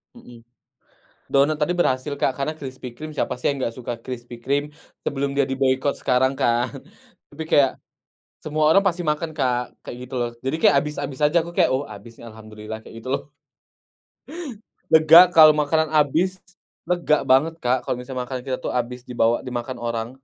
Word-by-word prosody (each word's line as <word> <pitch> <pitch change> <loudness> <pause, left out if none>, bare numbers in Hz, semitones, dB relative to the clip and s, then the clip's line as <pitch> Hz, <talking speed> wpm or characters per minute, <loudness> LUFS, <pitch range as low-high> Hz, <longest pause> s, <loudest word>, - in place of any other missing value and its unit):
Mhm. 120 - -15 0.9
Donat 145 +3 +4
tadi 150 +4 +1
berhasil 130 -2 0
Kak, 135 - +2
karena 140 +3 -1
Krispy 130 -2 -7
Kreme, 155 0 -7
siapa, - - -1
sih, - - -4
yang 140 - -6
nggak 115 -3 -2
suka 120 -1 -4
Krispy 120 -1 -7
Kreme. 140 +3 0 0.4
Sebelum 140 0 -1
dia 140 - +3
diboikot 135 +1 +1
sekarang, 130 +1 +2
kan, 120 +1 +2 0.6
tapi 150 +2 -7
kayak 140 -2 +5 0.7
semua 155 0 0
orang 195 +5 +5
pasti 180 -2 0
makan 150 +2 -1
Kak, 125 -2 -1
kayak - - -7
gitu, 125 +1 -9
loh. 120 - -1
Jadi 135 +4 -1
kayak 145 - +5
habis-habis 145 -2 -5
aja, 150 +3 +2
aku 170 +1 -6
kayak 180 - +4
"Oh, 135 +2 -1
abis, 105 +3 -12
nih, 120 - -11
alhamdulillah," 110 0 -9
kayak - - -14
gitu 120 - -9
loh. - - -2 1.7
Lega 160 +2 +9
kalo 155 -1 +9
makanan 160 +1 +1
abis, 180 +6 0 0.5
lega 170 -4 +2
banget 150 +5 +4
Kak, 125 +1 +2
kalo - - -1
makanan 125 0 -5
kita, 130 -1 -1
tuh, - - -1
abis 125 +1 -9
dibawa 115 -1 +2
dimakan 125 +1 -4
orang. 115 -1 -3
135 Hz, 170 wpm, -22 LUFS, 125-150 Hz, 1.7 s, Lega